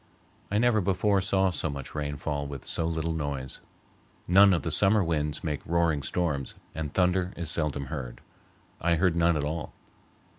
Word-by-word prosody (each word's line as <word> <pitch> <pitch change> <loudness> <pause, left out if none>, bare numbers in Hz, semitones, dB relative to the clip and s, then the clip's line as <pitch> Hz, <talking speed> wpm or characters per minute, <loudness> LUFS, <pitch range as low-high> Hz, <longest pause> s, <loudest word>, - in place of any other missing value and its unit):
I 105 - 0
never 115 -1 +3
before 95 +1 +2
saw 95 -1 +2
so 80 -1 -2
much 70 -2 -6
rain 75 -1 -3
fall 70 0 -3
with 70 -2 -8
so 80 - -2
little 80 0 -1
noise. 70 -4 -4 0.7
None 100 +3 +7
of 90 - +1
the 85 - -2
summer 100 +5 +4
winds 75 -3 -1
make 75 -3 -2
roaring 85 -3 +1
storms, 70 -2 -2 0.2
and 75 -1 -4
thunder 90 +1 +1
is 85 -2 -1
seldom 75 -4 -1
heard. 65 -4 -6 0.6
I 85 0 +3
heard 85 +1 +2
none 85 -1 +3
at 75 - -1
all. 75 +1 -4
80 Hz, 175 wpm, -28 LUFS, 75-90 Hz, 0.7 s, None